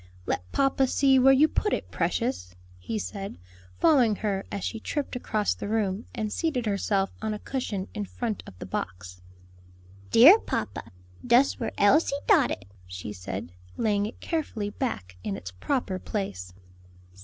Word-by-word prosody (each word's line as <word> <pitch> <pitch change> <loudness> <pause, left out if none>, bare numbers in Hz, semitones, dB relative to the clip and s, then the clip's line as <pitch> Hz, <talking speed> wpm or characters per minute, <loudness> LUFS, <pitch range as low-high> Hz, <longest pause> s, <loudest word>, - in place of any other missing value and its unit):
"Let 90 +1 -3
papa 270 -1 +2
see 270 0 +4
where 265 +1 +7
you 275 +3 +6
put 420 +6 0
it, - - -3
precious," 230 - -1 0.2
he 155 - -4
said, 200 - -5 0.4
following 255 -9 +4
her 195 -2 -2
as 200 -3 -4
she 225 - -3
tripped 285 +4 -3
across 215 -4 0
the - - -6
room 210 -1 -1
and 215 -1 -2
seated 290 -8 -1
herself 200 -1 0
on 215 -1 -1
a - - -4
cushion 210 -5 -3
in 205 - -3
front 220 +1 -3
of 90 - -12
the - - -7
box. 90 0 -5 0.9
"Dere, 310 - +9
papa, - - -4 0.3
dus 245 +3 +4
where 230 - -2
Elsie 280 +7 +4
dot 345 - +5
it," 95 - -5 0.2
she 90 +3 -6
said, 90 -1 -6 0.3
laying 205 -2 +1
it 225 - -10
carefully 235 -11 -3
back 95 - -4
in 100 -2 -3
its 95 - -8
proper 190 - -2
place. 95 - -4
210 Hz, 160 wpm, -27 LUFS, 185-260 Hz, 0.9 s, Dere